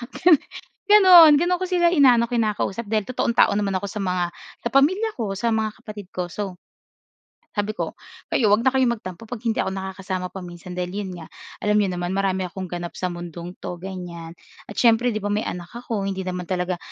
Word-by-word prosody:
Gan 345 -4 +6 0.5
gano'n. 365 -7 +9
Gano'n 355 +2 +1
ko - - +1
sila 350 -2 +3
inaano, 250 -7 +5
kinakausap 225 -2 -1
dahil 215 -3 0
totoong 255 -2 -1
tao - - +6
naman 205 -1 0
ako 200 - -5
sa 205 0 -4
mga 180 -1 0 0.3
sa 235 - -3
pamilya 375 +11 +3
ko, 220 -5 -2
sa 235 +2 +1
mga 220 -1 -2
kapatid 210 -4 -10
ko, 180 -1 -3
so 190 -1 -5 1.0
sabi 205 +1 0
ko. - - -5 0.3
"Kayo 215 -5 +3
huwag 215 - +3
na 260 - +4
kayong 260 -2 +2
magtampo 185 -2 -8
'pag 225 0 -7
hindi 230 -2 -1
ako 190 - 0
nakakasama 190 -1 -4
pa-minsan 180 -1 -9
dahil 180 0 -3
'yon 200 -1 -4
nga 165 - -9 0.3
alam 210 0 +2
niyo 200 - +1
naman, 175 0 -3
marami 190 -1 0
akong 185 +1 -6
ganap 175 0 -5
sa 185 - -3
mundong 175 0 -8
'to", 175 -1 -7
ganyan. 175 -3 -7 0.3
At 205 - -9
siyempre, 235 +1 +4
'di 220 - -2
ba, 205 -1 -2
may 210 - 0
anak 175 -4 -5
ako 230 -4 -4
hindi 195 -1 -3
naman 180 -1 -4
talaga 180 0 -2
200 Hz, 200 wpm, -23 LUFS, 180-235 Hz, 1.0 s, gano'n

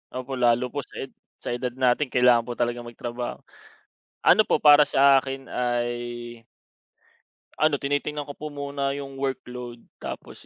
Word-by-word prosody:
Opo 130 0 -4
lalo 120 +1 +2
po 145 - -3
sa - - -8
ed 135 - -9 0.3
sa - - -5
edad 120 0 -3
natin 130 +2 +2
kailangan 125 -2 +4
po 120 - -4
talagang 120 0 -2
magtrabaho. 120 +1 -6 0.8
Ano - - +6
po - - +2
para 150 0 +8
sa 135 0 +5
akin 135 0 -3
ay 120 -1 -3 1.1
ano 155 -2 +2
tinitingnan 145 +1 -2
ko - - -5
po 150 -1 -7
muna 140 -1 -2
'yung 140 -1 -7
workload, 125 -3 -5 0.2
tapos - - -8
125 Hz, 150 wpm, -25 LUFS, 120-140 Hz, 1.1 s, para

